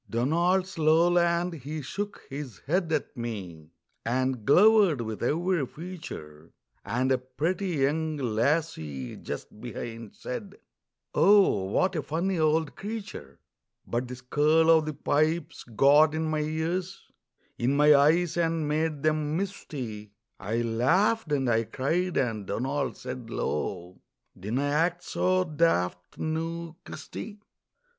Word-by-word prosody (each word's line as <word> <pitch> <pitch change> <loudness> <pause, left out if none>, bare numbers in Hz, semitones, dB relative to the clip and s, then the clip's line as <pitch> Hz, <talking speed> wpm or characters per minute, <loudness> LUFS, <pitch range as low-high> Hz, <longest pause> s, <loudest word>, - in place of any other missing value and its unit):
Donald's 170 +9 +1
lowland, 170 +2 +3
he 150 0 -6
shook 205 +9 -5
his 135 -7 -7
head 170 +2 0
at 155 - -1
me, 95 - -6 0.3
And 125 -1 -1
glowered 195 - +6
with 110 -2 -5
every 170 +5 +1
feature, 120 - -9 0.3
And 130 +2 0
a 130 - +3
pretty 160 +10 -2
young 155 0 0
lassie 115 - -1
just 105 - -7
behind 115 -2 -7
Said: 195 +10 -6 0.6
"Oh, 195 - +5
what 185 - +1
a 155 - 0
funny 170 +6 -1
old 155 -1 +1
creature!" 215 0 -7 0.5
But 120 +2 -2
the 125 - -6
skirl 150 +6 +3
o' 160 -1 +6
the 155 -1 -5
pipes 155 +4 0
got 145 +6 +5
in 160 0 -1
my 155 - 0
ears, 160 +4 -2 0.6
In 125 +4 +1
my 150 +1 +7
eyes, 160 +4 +3
and 165 -2 0
made 155 -1 -1
them 155 0 +1
misty; 125 - -5 0.3
I 110 +4 -1
laughed 160 - +2
and 135 -3 +1
I 115 -1 +2
cried, 170 +10 -1
and 110 -7 -1
Donald 135 +6 -2
said 125 -2 -7
low: 90 -1 -3 0.3
"Dinna 110 +9 -2
act 165 +5 +1
so 185 0 +1
daft, 150 - 0
noo, 165 +1 -3
Christy!" 210 -1 -8
150 Hz, 125 wpm, -27 LUFS, 120-170 Hz, 0.6 s, my